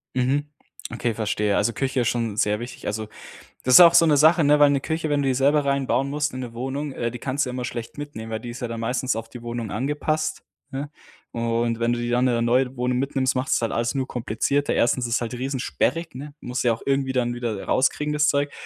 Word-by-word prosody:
Mhm, 130 +3 +1 0.5
okay, 120 -1 -1
verstehe. 105 -1 0
Also, 105 +3 +2
Küche 135 0 -1
ist 120 - +1
schon 115 -4 -2
sehr 105 0 +1
wichtig. 120 +1 -8
Also, 110 +1 -3 0.6
das 130 - +3
ist - - +11
auch 170 -1 +9
so 165 - +7
'ne 150 -2 +4
Sache, 160 +4 +5
ne, 150 0 +4
weil 145 -1 +6
'ne 140 -1 +1
Küche, 160 +2 -2
wenn 145 -1 +2
du 135 - +1
die 130 - +2
selber 140 +3 +3
rein 140 -1 0
bauen 135 +2 +1
musst 150 +1 -1
in 130 - -5
'ne 120 -2 -7
Wohnung, 135 +4 -4
äh, 120 -2 -2
die 125 - -7
kannst 140 +3 -1
du 125 - -4
ja - - -6
immer 125 0 -4
schlecht 120 +4 -7
mitnehmen, 145 -7 -7
weil 110 - -2
die 120 - -7
ist 120 - -8
ja 120 - -3
dann 115 0 -5
meistens 125 +2 -1
auf 115 0 -5
die 120 0 -10
Wohnung 120 -2 -4
angepasst, 150 +3 -1 0.3
ne? 140 +2 -5 0.4
Und, 115 0 -1
wenn 115 +1 +2
du 120 - -1
die 120 0 -3
dann 125 +1 +2
in 120 - +1
'ne 115 - 0
neue 125 +2 +2
Wohnung 125 0 0
mitnimmst, 135 -1 0
macht's 130 +2 +1
halt 115 - -1
alles 115 +2 -1
nur 135 -2 -1
komplizierter. 125 +4 -1
1. 120 +1 +2
ist 120 0 0
es - - 0
halt 120 +1 -4
riesensperrig, 135 +6 -2
ne? 145 +3 -8
Musst 125 +1 -3
ja 120 - +4
auch 115 - -6
irgendwie 135 -1 +1
dann 120 -2 0
wieder, 120 -4 -3
äh, - - -7
rauskriegen, 150 +3 +1
das 150 0 +2
Zeug. 145 0 +1
125 Hz, 255 wpm, -24 LUFS, 120-140 Hz, 0.6 s, ist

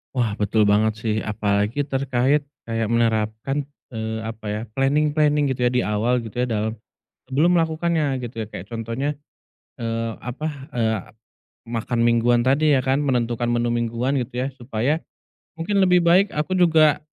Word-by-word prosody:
Wah, 120 -4 +1
betul 105 +1 +2
banget 105 +1 +3
sih. 105 0 -2
Apalagi 105 +4 0
terkait 135 +1 +1 0.2
kayak 115 -1 -2
menerapkan 115 +4 0 0.2
eee, 110 -1 -4
apa 110 0 -7
ya, 105 +1 -2
planing-planing 145 +2 +2
gitu 125 -1 +1
ya, - - 0
di 125 0 +1
awal 115 +4 0
gitu 115 +1 -7
ya, 125 - +1
dalam 110 -1 -1 0.6
sebelum 165 +7 +3
melakukannya, 160 -4 +1
gitu 115 -2 -5
ya. - - -6
Kayak 90 - -8
contohnya, 115 +6 -3 0.7
eee, 115 0 -2
apa, 130 +6 -4 0.3
eee, 110 -2 +1 0.7
makan 120 +1 -2
mingguan 120 0 +3
tadi 145 +3 +4
ya 130 - 0
kan, 135 +1 +2
menentukan 120 -4 0
menu 120 0 +1
mingguan 120 +3 0
gitu 125 +1 -3
ya, - - -1
supaya 125 +5 -1 0.6
mungkin 195 +5 +1
lebih 180 -2 +4
baik 185 +4 +5
aku 150 +5 0
juga 160 -4 +4
120 Hz, 155 wpm, -22 LUFS, 115-145 Hz, 0.7 s, baik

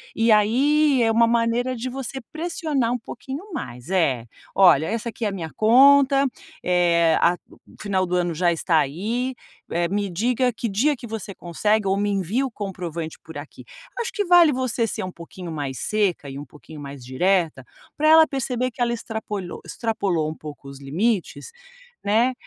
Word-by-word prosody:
E 225 0 +3
aí 265 +6 +4
é 225 - +3
uma 230 +1 +4
maneira 235 +2 +1
de 250 +2 -4
você 265 +1 -5
pressionar 310 -7 -1
um - - 0
pouquinho 275 - -8
mais. 125 - -7
É, 140 -11 +1 0.3
"Olha, 170 -6 +6
essa 230 +2 -2
aqui 230 - -5
é - - +2
a - - -5
minha 165 -5 -5
conta, 275 +4 +6 0.4
eh, 170 -2 +3
a 175 +1 +3 0.4
final 190 -2 0
do 180 0 -2
ano 175 -1 0
já 175 +2 +2
está 165 0 +1
aí, 225 - -2 0.4
eh, 170 0 0
me 200 +1 -1
diga 245 +6 0
que 230 - -3
dia 270 +9 +2
que 240 - -10
você 215 -3 -6
consegue 210 +5 0
ou 190 +1 +2
me 205 +1 0
envia 200 +7 0
o 260 - -5
comprovante 175 -6 -5
por 160 - -10
aqui". 145 +1 -10 0.3
Acho 470 - -2
que 410 - 0
vale 345 -4 +6
você 250 -2 -1
ser - - -4
um 185 - -5
pouquinho 170 0 -9
mais 140 -5 -4
seca 200 -9 0
e 135 +1 -7
um 145 - -8
pouquinho 150 +3 -13
mais 140 -2 -9
direta, 160 +1 0 0.3
para 310 - +2
ela 320 0 +8
perceber 255 -2 -2
que 240 - -9
ela 235 0 +2
extrapolho 210 -5 -5
extrapolou 195 -9 -1
um 155 - -6
pouco 150 -3 -10
os 140 -1 -11
limites, 185 - -2 0.5
né, 230 +5 +2
210 Hz, 180 wpm, -23 LUFS, 170-250 Hz, 0.5 s, ela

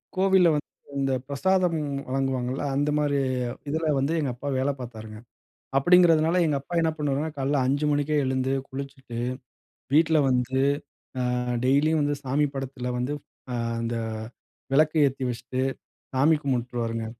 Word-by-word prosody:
கோவில்ல 190 -1 +5
வந்து 150 - -3 0.3
இந்த 135 0 +1 0.2
பிரசாதம் 180 +4 +1 0.3
வழங்குவாங்கள்ல, 130 -1 -1
அந்த 145 +2 +1
மாரி 145 -1 +1 0.5
இதில 160 +1 0
வந்து 140 +4 0
எங்க 140 -4 -1
அப்பா 135 +4 -7
வேல 130 +2 +1
பாத்தாருங்க. 110 -3 -8 0.6
அப்படிங்குறதுனால 165 +1 +5
எங்க 150 -3 +1
அப்பா 140 - -10
என்ன 160 -1 +2
பண்ணுவாருன்னா, 145 +1 -1
காலையில் 135 0 +1
5 140 +3 +1
மணிக்கே 145 +1 +1
எழுந்து, 130 0 0 0.2
குளிச்சுட்டு 135 -3 -7 0.8
வீட்ல 160 +1 +5
வந்து, 130 +1 +1 0.6
அ - - 0 0.4
டெய்லியும் 150 +4 +3
வந்து 145 0 +1
சாமி 140 +3 +1
படத்தில 130 -2 -4
வந்து, 125 +4 -1 0.4
அ - - -1 0.2
அந்த 115 0 -2 0.8
விளக்கு 155 +3 +4
ஏத்தி 135 0 -4
வச்சிட்டு 125 +2 -3 0.5
சாமி 145 +5 +4
கும்பிட்டுருவாருங்க. 120 -3 -2
140 Hz, 135 wpm, -26 LUFS, 130-155 Hz, 0.8 s, கோவில்ல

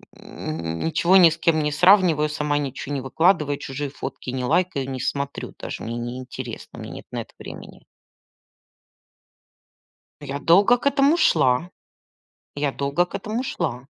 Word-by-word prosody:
ничего 85 - -1
ни 175 -3 +8
с 165 - -5
кем 160 -3 +2
не 150 - 0
сравниваю, 175 -3 +5
сама 150 -1 -1
ничего 140 0 -4
не 135 - -2
выкладываю, 150 +1 +2
чужие 140 +1 -5
фотки 130 - -7
не 130 0 -3
лайкаю, 140 -3 0
не 130 -1 -4
смотрю, 140 +1 -3
даже - - -6
мне 115 +1 -4
неинтересно, 125 0 -7
мне - - -8
нет - - -9
на - - -3
это - - -13
времени. - - -11 2.4
Я 140 0 -5
долго 195 - +5
к 240 - -12
этому 280 +2 +4
шла. 155 - +3 0.9
Я 145 -1 0
долго 140 +6 0
к - - -20
этому 225 +4 -3
шла. 135 - -3
145 Hz, 145 wpm, -23 LUFS, 130-175 Hz, 2.4 s, ни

